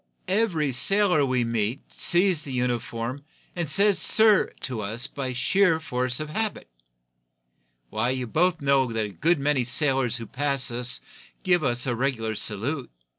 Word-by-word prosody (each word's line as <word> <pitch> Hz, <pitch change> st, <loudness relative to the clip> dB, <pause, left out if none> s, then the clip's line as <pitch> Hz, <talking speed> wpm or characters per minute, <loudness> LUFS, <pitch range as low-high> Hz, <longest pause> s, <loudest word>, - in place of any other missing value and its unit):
Every 185 Hz, -8 st, 0 dB
sailor 180 Hz, +5 st, +3 dB
we 130 Hz, -1 st, 0 dB
meet 115 Hz, +2 st, -3 dB
sees 175 Hz, -2 st, +3 dB
the 140 Hz, -, -7 dB
uniform, 125 Hz, +1 st, -3 dB, 0.3 s
and 170 Hz, -4 st, -3 dB
says 200 Hz, +3 st, +4 dB
'sir' 220 Hz, -2 st, +5 dB
to 125 Hz, -4 st, -4 dB
us 110 Hz, +5 st, -3 dB
by 135 Hz, -2 st, -5 dB
sheer 165 Hz, +7 st, +2 dB
force 125 Hz, -3 st, -3 dB
of 155 Hz, -, -4 dB
habit. 220 Hz, -, -3 dB, 1.2 s
Why, 110 Hz, +3 st, -1 dB
you 130 Hz, -1 st, -2 dB
both 170 Hz, +7 st, 0 dB
know 135 Hz, -3 st, +2 dB
that 110 Hz, -1 st, -2 dB
a -, -, -6 dB
good 160 Hz, -, 0 dB
many 140 Hz, -2 st, 0 dB
sailors 130 Hz, -2 st, 0 dB
who 115 Hz, -, -7 dB
pass 140 Hz, +1 st, -1 dB
us 125 Hz, +1 st, 0 dB, 0.4 s
give 180 Hz, -4 st, +2 dB
us 120 Hz, -2 st, 0 dB
the 125 Hz, -2 st, -1 dB
regular 115 Hz, -3 st, -2 dB
salute. 120 Hz, +7 st, -3 dB
135 Hz, 155 wpm, -24 LUFS, 120-160 Hz, 1.2 s, sir